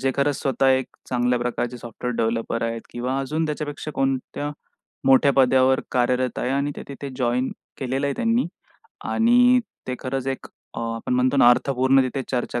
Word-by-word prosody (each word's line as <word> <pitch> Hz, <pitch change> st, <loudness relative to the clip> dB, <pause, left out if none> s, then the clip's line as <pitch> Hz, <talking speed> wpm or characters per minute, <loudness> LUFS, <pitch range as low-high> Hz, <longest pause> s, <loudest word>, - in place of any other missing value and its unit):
जे 135 Hz, -, +1 dB
खरंच 140 Hz, 0 st, +1 dB
स्वतः 135 Hz, 0 st, +2 dB
एक 130 Hz, -1 st, +2 dB, 0.2 s
चांगल्या 125 Hz, 0 st, +1 dB
प्रकारचे 120 Hz, 0 st, -2 dB
सॉफ्टवेअर 120 Hz, +1 st, -5 dB
डेव्हलपर 115 Hz, 0 st, -1 dB
आहेत 115 Hz, 0 st, -2 dB
किंवा 125 Hz, +3 st, -2 dB
अजून 155 Hz, +4 st, -1 dB
त्याच्यापेक्षा 150 Hz, 0 st, -4 dB
कोणत्या 135 Hz, +2 st, -1 dB, 0.6 s
मोठ्या 135 Hz, +1 st, +6 dB
पदावर 130 Hz, 0 st, +4 dB
कार्यरत 125 Hz, 0 st, +1 dB
आहे 125 Hz, -, -1 dB
आणि 140 Hz, +2 st, 0 dB
ते -, -, -6 dB
तिथे 140 Hz, 0 st, -7 dB
जॉइन 125 Hz, 0 st, 0 dB, 0.3 s
केलेलं 135 Hz, +2 st, -1 dB
आहे 140 Hz, -, -1 dB
त्यांनी 235 Hz, -1 st, +1 dB, 0.6 s
आणि 245 Hz, +2 st, +5 dB, 0.3 s
ते 130 Hz, -, -2 dB
खरंच 135 Hz, 0 st, -3 dB
एक 135 Hz, 0 st, -3 dB, 0.3 s
अ, -, -, -4 dB
आपण 115 Hz, +2 st, -2 dB
म्हणतो 130 Hz, +2 st, +2 dB
ना, 120 Hz, -, +7 dB
अर्थपूर्ण 130 Hz, +1 st, +3 dB
तिथे 130 Hz, +1 st, -2 dB
चर्चा 120 Hz, -1 st, -1 dB
130 Hz, 165 wpm, -23 LUFS, 125-140 Hz, 0.6 s, ना